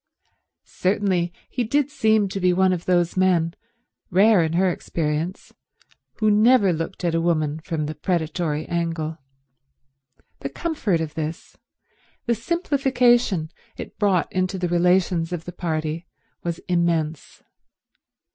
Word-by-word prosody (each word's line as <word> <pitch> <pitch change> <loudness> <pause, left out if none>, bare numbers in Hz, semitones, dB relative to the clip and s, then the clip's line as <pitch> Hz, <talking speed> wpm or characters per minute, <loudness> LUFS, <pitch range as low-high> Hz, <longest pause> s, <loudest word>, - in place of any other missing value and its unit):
Certainly 185 -2 0 0.2
he 250 - -2
did 285 +5 0
seem 220 -6 +2
to 195 - -4
be 180 -1 +3
one 190 +1 +3
of 175 -2 -4
those 175 -2 +2
men, 175 -3 +2 0.6
rare 200 +1 +5
in 160 0 -1
her 185 +3 +3
experience, 160 +2 -3 0.6
who 215 -1 +1
never 210 -2 +5
looked 165 +3 -4
at 170 - +1
a 165 - +1
woman 155 -3 0
from 160 -2 -3
the 155 - -4
predatory 160 -2 -2
angle. 165 -2 -3 1.2
The 140 - -4
comfort 205 - -1
of 155 -2 -4
this, 160 +2 -5 0.7
the 240 - +2
simplification 245 - +1 0.3
it - - -9
brought 195 -4 +1
into 185 +1 0
the 180 -1 -2
relations 175 -1 +2
of 175 -2 -4
the 175 - -6
party, 160 0 -3 0.4
was 170 -1 -2
immense. 165 -3 -1
175 Hz, 130 wpm, -23 LUFS, 165-200 Hz, 1.2 s, rare